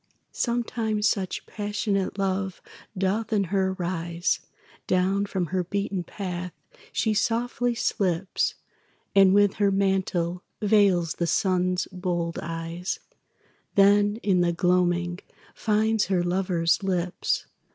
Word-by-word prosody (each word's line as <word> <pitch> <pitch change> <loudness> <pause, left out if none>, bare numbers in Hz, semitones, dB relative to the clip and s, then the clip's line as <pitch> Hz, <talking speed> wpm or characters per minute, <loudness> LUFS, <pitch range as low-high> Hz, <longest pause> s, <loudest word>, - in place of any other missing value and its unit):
Sometimes 225 -3 0
such 190 -3 -1
passionate 205 -2 -2
love 190 -1 -1 0.4
doth 200 +4 0
in 210 -2 +2
her 190 -1 +2
rise, 175 -1 -1 0.5
Down 190 +2 +2
from 190 -3 -1
her 185 -1 +1
beaten 200 0 -2
path 180 -1 -5 0.4
she 220 - +1
softly 240 +3 0
slips, 190 -5 0 0.6
And 195 -1 +6
with 205 0 +4
her 200 - +5
mantle 190 -3 0 0.2
veils 200 -6 +3
the 170 - +1
Sun's 180 +1 +1
bold 175 -2 -2
eyes, 165 +3 -4 0.8
Then 205 +1 +5
in 190 -3 +3
the 175 -1 +3
gloaming 175 0 +1 0.3
finds 220 0 +1
her 185 -2 +1
lover's 175 -2 +1
lips. 180 -2 -1
190 Hz, 110 wpm, -26 LUFS, 175-205 Hz, 0.8 s, And